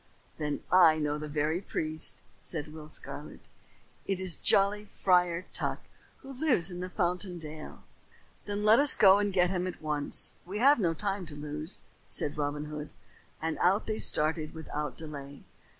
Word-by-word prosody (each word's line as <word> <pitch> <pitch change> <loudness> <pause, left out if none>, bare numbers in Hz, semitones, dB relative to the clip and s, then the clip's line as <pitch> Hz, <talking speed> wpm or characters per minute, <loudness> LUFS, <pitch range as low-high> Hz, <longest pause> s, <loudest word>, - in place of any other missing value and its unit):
"Then 150 -1 -3
I 170 -4 +6
know 150 -1 -2
the 150 - -6
very 150 +4 -1
priest," 155 -4 -2 0.2
said 150 -2 -6
Will 155 -1 -10
Scarlet. - - -8 0.7
"It 195 -2 -1
is 185 -3 -1
jolly 200 +1 +2
Friar 180 -3 +1
Tuck - - -2 0.5
who 270 - -9
lives 250 - +1
in 180 +1 -5
Fountain 180 0 -2
Dale." 155 -1 -10 0.6
"Then 205 0 -3
let 215 +2 +6
us 285 -1 +7
go 195 0 +6
and 205 -1 0
get 180 -1 +2
him 185 -1 -1
at 185 - -6
once. 150 -2 +2
We 190 +4 -6
have 275 +4 +5
no 170 -5 0
time 195 0 -3
to 150 - -9
lose," 150 +3 -4 0.3
said 145 - +2
Robin 145 0 -3
Hood; 150 0 -7 0.5
and 160 0 -2
out 190 +4 +2
they 215 -1 -3
started 155 0 +3
without 150 -2 -5
delay. 145 -3 -8
170 Hz, 165 wpm, -29 LUFS, 150-195 Hz, 0.7 s, us